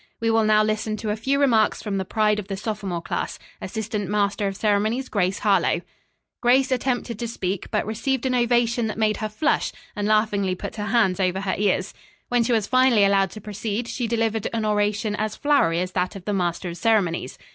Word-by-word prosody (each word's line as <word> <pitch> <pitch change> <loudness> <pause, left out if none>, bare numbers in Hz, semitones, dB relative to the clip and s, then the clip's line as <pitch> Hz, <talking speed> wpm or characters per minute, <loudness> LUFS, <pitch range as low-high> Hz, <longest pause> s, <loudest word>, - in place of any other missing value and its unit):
We 225 0 +1
will 225 0 +3
now 215 0 +4
listen 215 0 -1
to 215 -1 -3
a - - 0
few 270 +6 0
remarks 230 -7 +3
from 200 -3 -2
the 190 - -3
pride 210 +1 +1
of 200 - -7
the 195 - -4
sophomore 195 -5 -4
class, - - -3 0.2
Assistant 215 -2 -4
Master 205 0 0
of 195 - -3
Ceremonies 215 +5 0
Grace 190 -2 0
Harlowe." 205 -2 +2 0.6
Grace 260 +2 +3
attempted 245 -3 -1
to 235 - -2
speak, 190 -4 -3
but - - 0
received 235 +5 -2
an 260 - +1
ovation 240 -1 +2
that 215 - -4
made 215 -1 +1
her 215 - -3
flush 300 +9 0 0.2
and 205 -1 -1
laughingly 210 -3 +2
put 185 - -7
her 205 0 -3
hands 205 -4 +2
over 190 0 0
her 195 -1 -1
ears. 195 -1 0 0.4
When 245 -1 +2
she 235 - -1
was 220 -4 +2
finally 255 -3 +4
allowed 195 -1 +3
to 215 - -10
proceed, 215 +2 -4
she 240 -1 -3
delivered 225 -1 0
an 225 -1 -1
oration 210 0 0
as 215 0 -2
flowery 230 - +2
as 180 0 -3
that 185 +2 -1
of 190 -2 -9
the 210 - -1
master 175 -1 -1
of 170 - -7
ceremonies. 180 -3 +1
215 Hz, 210 wpm, -23 LUFS, 200-230 Hz, 0.6 s, now